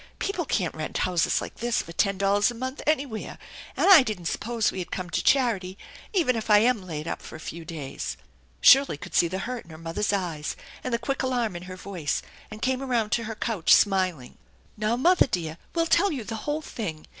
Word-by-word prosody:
People 370 -4 -2
can't 180 - -1
rent 155 -1 -4
houses 180 -2 +1
like - - -8
this 240 0 0
for 165 - -10
ten 195 +3 +1
dollars 200 +1 +3
a 240 - -6
month 260 +4 -5
anywhere, 280 -7 -1 0.4
and - - +2
I 380 -6 +10
didn't 215 -8 -4
suppose 230 +5 0
we - - -6
had 180 - -5
come 180 -2 -5
to - - -1
charity, 210 -9 +2 0.3
even 330 - +2
if 225 -1 -4
I 210 - +8
am 230 0 +3
laid 155 -2 -5
up - - -4
for - - -10
a - - -8
few 165 +1 -7
days." 140 - -6 0.4
Shirley 270 - +7
could - - -10
see 170 - +4
the 185 +3 -4
hurt 245 +4 -4
in - - -19
her 160 - -10
mother's 165 +6 -2
eyes 175 -7 -2 0.3
and 255 - -3
the 235 - +2
quick 240 +4 -2
alarm 245 -6 -1
in 175 - -5
her 185 - -7
voice, 180 -6 -3 0.3
and 215 0 -9
came 260 0 +1
around 235 -5 0
to 230 - 0
her 225 0 -5
couch, 215 -7 0
smiling. 185 -10 +1 0.2
" - - -33
Now, 215 +2 0
mother 350 +5 +4
dear, 165 -7 -3 0.2
we'll 330 -1 +2
tell 390 +4 +3
you 270 -7 -3
the 225 +1 -5
whole 305 +1 -1
thing. 165 - -5
210 Hz, 225 wpm, -26 LUFS, 175-255 Hz, 0.4 s, I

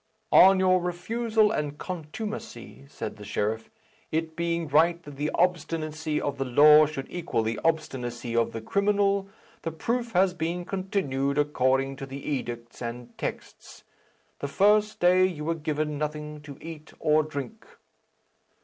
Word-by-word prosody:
"On 190 0 +8
your 185 -1 +4
refusal 215 +5 +1
and 150 -7 -2
contumacy," 185 +2 -7
said 110 - -6
the 105 - -10
sheriff, 105 +2 -2 0.4
"it 160 0 -2
being 170 0 -1
right 165 +4 +4
that 145 -2 -10
the 145 +2 -1
obstinacy 160 -3 0
of 140 -1 -3
the - - +1
law 150 +4 +7
should 140 -3 -5
equal 170 -10 -2
the 110 +1 -2
obstinacy 125 -7 -2
of 115 0 +2
the 115 - -5
criminal, 200 - +1 0.3
the 165 - -3
proof 235 +8 -2
has 185 0 +4
been 175 +1 -3
continued 180 -9 -1
according 135 -2 +1
to 135 - -7
the 135 +1 -8
edicts 120 -5 -4
and 120 0 -6
texts. - - -7 0.6
The 140 - -3
first 210 +6 +3
day 180 +1 +5
you 170 -5 -1
were 165 - +1
given 150 -2 -2
nothing 150 0 -4
to 140 -2 -9
eat 160 -1 -9
or 155 0 +4
drink." 155 - -6
155 Hz, 150 wpm, -27 LUFS, 140-180 Hz, 0.6 s, On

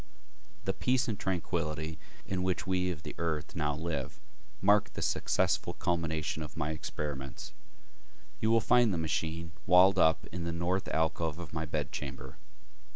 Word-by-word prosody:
The - - +1
peace 125 +1 +1
and 110 -4 -2
tranquility 80 -3 -2 0.3
in 95 -1 -2
which 90 +1 0
we 90 -1 +1
of 85 -4 -4
the - - -6
earth 80 -2 -2
now 75 -3 0
live 80 -4 -3 0.4
marked 105 +1 +4
the - - -3
successful - - +1
culmination 80 -2 -1
of 75 0 -7
my 75 -1 -1
experiments. 70 -3 -5 0.9
You 110 - +2
will 115 0 +5
find 120 0 +5
the 90 - 0
machine 80 +1 -2 0.2
walled 95 +2 +7
up 80 -1 +4
in 90 0 -4
the 85 - -1
North 85 +3 0
alcove 80 0 0
of 85 -4 -8
my 80 0 -2
bedchamber. 70 -3 -4
80 Hz, 155 wpm, -31 LUFS, 75-90 Hz, 0.9 s, walled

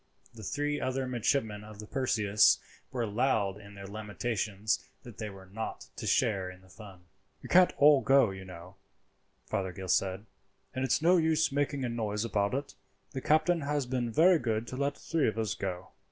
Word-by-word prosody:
The 115 - -11
three 145 +7 -2
other 130 0 -1
midshipmen 120 -3 -1
of 105 -1 -11
the 105 - -8
Perseus 110 -5 +3 0.3
were 120 -3 -1
loud 105 -3 0
in 100 0 -13
their 100 0 -9
lamentations 105 0 -2
that 120 -4 -12
they 110 -2 -4
were 95 -1 -12
not 105 +4 -6
to - - -5
share 100 -7 +1
in 90 0 -12
the 95 - -20
fun. 100 -3 -13 0.4
"You - - -9
can't 180 0 +6
all 145 -1 +6
go, 135 -6 +4
you 95 0 -8
know," 90 +1 -11 0.7
Fothergill 95 -1 -4
said, 95 +2 +1 0.5
"and 130 - -2
it's 130 +4 +1
no 180 +2 +6
use 160 -2 +2
making 140 -1 -1
a - - 0
noise 110 -2 -2
about 105 0 0
it; 140 0 -4 0.4
the 135 - -5
captain 160 +4 +2
has 145 -1 -1
been 125 -2 -2
very 170 +6 +5
good 115 -3 -1
to - - -6
let 140 +2 -1
three 165 -4 0
of 110 -1 -2
us 110 -3 -1
go." 90 -2 -5
110 Hz, 185 wpm, -30 LUFS, 100-140 Hz, 0.7 s, can't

